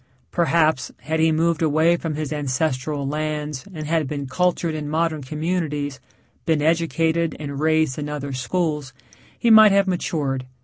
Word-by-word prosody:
Perhaps, 160 -4 +2
had 160 +5 -2
he 160 0 +4
moved 165 +1 +1
away 160 +2 +3
from 165 -3 -4
his 155 0 -3
ancestral 140 0 -1
lands 150 -2 -3
and 155 -4 -6
had 160 -1 0
been 140 0 -4
cultured 170 +3 0
in 150 -1 -4
modern 160 0 0
communities, 150 -1 -3 0.4
been 160 -2 +1
educated 165 +1 +1
and 140 -2 -5
raised 155 -3 +1
in 150 0 -4
other 140 -2 -4
schools, 150 +1 -2 0.4
he 235 - +2
might 220 -1 +9
have 200 0 +4
matured. 145 -8 -2
155 Hz, 150 wpm, -22 LUFS, 145-165 Hz, 0.4 s, might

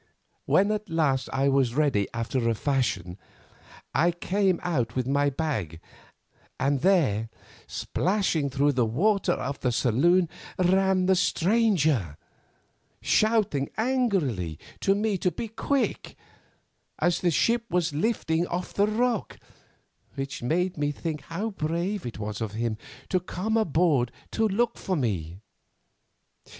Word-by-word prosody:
When 200 +2 +4
at 215 0 -3
last 145 -5 +1
I 135 +1 +1
was 135 -3 +2
ready 140 -10 +2
after 115 +1 -1
a 115 - +1
fashion, 105 -9 -1 0.7
I 170 - +3
came 185 +2 0
out 125 -9 -1
with 130 -1 0
my 140 +2 +2
bag, 130 - -3 0.8
and 135 0 +1
there, 135 - +2 0.4
splashing 175 -6 0
through 140 +2 +2
the 125 -3 +1
water 190 - +2
of 140 -3 -4
the 125 - 0
saloon, 155 +10 +3 0.3
ran 185 +1 +3
the 190 - +4
stranger, 165 - +2 0.8
shouting 215 -11 +2
angrily 190 - 0 0.2
to 195 - +2
me 205 -2 0
to 180 - +2
be 230 - -5
quick, 275 +5 -1 0.8
as 175 -1 +1
the 180 - +3
ship 230 +8 +2
was 175 -4 0
lifting 165 -2 0
off 180 +1 -4
the 200 +1 +2
rock, 230 0 -1 0.8
which 135 0 -5
made 175 +8 0
me 145 0 +1
think 150 0 -4
how 200 +7 -3
brave 170 0 -2
it 115 - -7
was 105 +1 -5
of 110 -2 -3
him 115 0 -1 0.3
to 185 - +2
come 185 +5 -3
aboard 160 - +2 0.2
to 225 - +1
look 230 +4 0
for 190 - -1
me. 95 - -2
160 Hz, 135 wpm, -26 LUFS, 130-195 Hz, 0.8 s, When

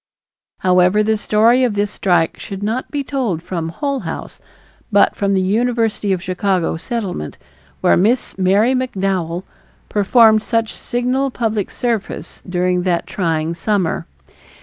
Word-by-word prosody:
However, 185 +3 +4
the 220 +1 +2
story 225 +4 +3
of 235 -5 +1
this 205 0 0
strike 175 -6 +1
should 195 0 -7
not 225 +5 -2
be 285 -1 -2
told 240 - -2
from 165 -3 -3
Hull 280 - -2
House, 180 - -7 0.5
but 205 - +4
from 200 -1 0
the 190 - +2
University 225 0 0
of 185 -2 -1
Chicago 185 -2 0
Settlement, 190 - -4 0.4
where - - +4
Miss 225 +8 +1
Mary 195 +6 +3
McDowell 190 -8 -1 0.5
performed 215 +1 +5
such 225 0 -1
signal 250 +3 -1
public 220 -5 -2
service 230 -5 -3
during 180 0 +1
that 175 -2 0
trying 165 -3 -1
summer. 175 -2 -1
205 Hz, 135 wpm, -18 LUFS, 180-230 Hz, 0.5 s, performed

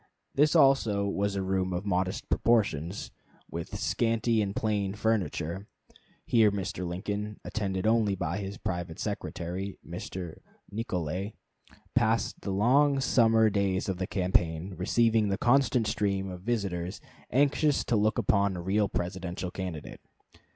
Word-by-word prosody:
This 150 +4 +3
also 135 -9 +4
was 100 0 -1
a 95 - -1
room 95 -1 0
of 90 +3 -3
modest 95 0 -1
proportions, 100 -7 +1 0.4
with 85 0 -5
scanty 115 -1 +1
and 100 -1 -2
plain 105 -3 0
furniture. 100 -4 -1 0.6
Here 110 -3 +5
Mr. 90 -2 -3
Lincoln, 105 +4 -4
attended 95 -3 -2
only 110 -3 +3
by 90 +1 -2
his 100 0 -5
private 85 -2 -4
secretary, 90 +3 -4
Mr. 90 0 -6 0.3
Nicolay, 95 -2 -3 0.6
passed - - +1
the - - -5
long 135 +8 +3
summer 115 -4 +4
days 100 -2 0
of 95 -2 -1
the 95 0 -2
campaign, 90 -1 0
receiving 110 +3 +2
the 95 - 0
constant 125 -2 +3
stream 100 -3 -1
of 90 -1 -8
visitors 95 -5 -2 0.3
anxious 145 +3 +2
to 120 - 0
look 110 +1 +2
upon 100 -2 +2
a - - -4
real 100 +2 +1
Presidential 90 0 -3
candidate. 90 -6 -6
100 Hz, 135 wpm, -29 LUFS, 90-110 Hz, 0.6 s, Here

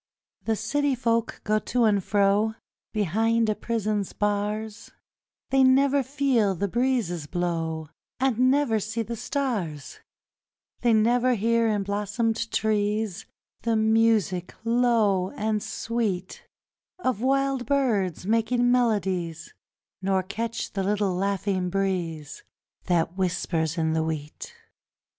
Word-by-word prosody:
The 225 - +1
city 280 +6 0
folk 230 -2 -1
go 215 0 +2
to 245 +2 0
and 205 -3 +3
fro 205 +2 +2 0.4
Behind 225 +3 +1
a - - +3
prison's 215 -3 -2
bars, 210 +1 -2 0.6
They 270 0 +5
never 275 +2 +4
feel 260 -7 +1
the 200 +4 -1
breezes 225 - 0
blow 165 -2 -2 0.3
And 255 -1 +3
never 270 -5 +2
see 220 +3 -3
the 235 +2 -5
stars; 220 - -3 0.8
They 240 - +2
never 240 +3 +3
hear 230 +2 +2
in 210 -2 0
blossomed 210 +3 -1
trees 210 -2 -1 0.3
The 230 -1 0
music 220 -4 +2
low 230 -6 +2
and 215 0 -1
sweet 210 -7 -3 0.5
Of 255 - -1
wild 270 -1 +1
birds 215 - 0
making 240 +3 +2
melodies, 190 -9 0 0.5
Nor 190 0 +1
catch 225 +4 -4
the 195 - -1
little 200 -1 0
laughing 195 -1 -1
breeze 175 -6 -2 0.4
That 170 -1 +1
whispers 170 -3 -1
in 160 -1 +1
the 160 - +1
wheat. 155 -2 -5
215 Hz, 115 wpm, -26 LUFS, 190-235 Hz, 0.8 s, They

